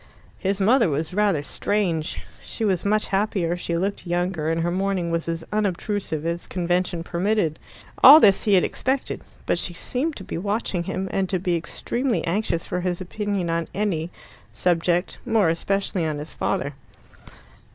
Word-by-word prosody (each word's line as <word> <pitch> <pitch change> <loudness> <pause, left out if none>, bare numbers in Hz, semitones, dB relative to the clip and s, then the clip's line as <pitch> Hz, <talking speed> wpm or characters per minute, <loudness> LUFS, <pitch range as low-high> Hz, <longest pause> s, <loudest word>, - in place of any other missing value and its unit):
His 195 +1 -1
mother 230 +1 +4
was 155 +4 -2
rather 200 -7 +2
strange. 175 -1 -1 0.2
She 225 - -4
was 190 -4 +1
much 210 +1 +2
happier, 195 -4 0
she 170 -1 -2
looked 195 +1 -2
younger, 175 -2 -1
and 165 0 0
her 175 - 0
mourning 185 -2 -1
was 165 0 -1
as 165 0 -3
unobtrusive 200 -5 -1
as 170 +1 -3
convention 175 -1 -1
permitted. 175 -2 0 0.4
All 290 +4 +12
this 200 -8 +5
he 205 -2 +5
had 180 - +4
expected. 265 +1 -1 0.2
But - - +1
she 175 0 -2
seemed 285 - -2
to 190 - -8
be 170 - -5
watching 200 -3 -2
him, 190 +2 -3
and 190 -1 0
to 190 - +1
be 180 -1 0
extremely 235 +9 -2
anxious 170 -1 -1
for 180 - -2
his 180 -1 -1
opinion 195 -1 -2
on 165 0 -1
any, 180 -5 -1 0.4
subject 175 +1 0
more 225 -7 +3
especially 195 +2 -1
on 155 -2 -1
his 150 +2 -7
father. 140 +1 -1
180 Hz, 165 wpm, -24 LUFS, 170-205 Hz, 0.4 s, All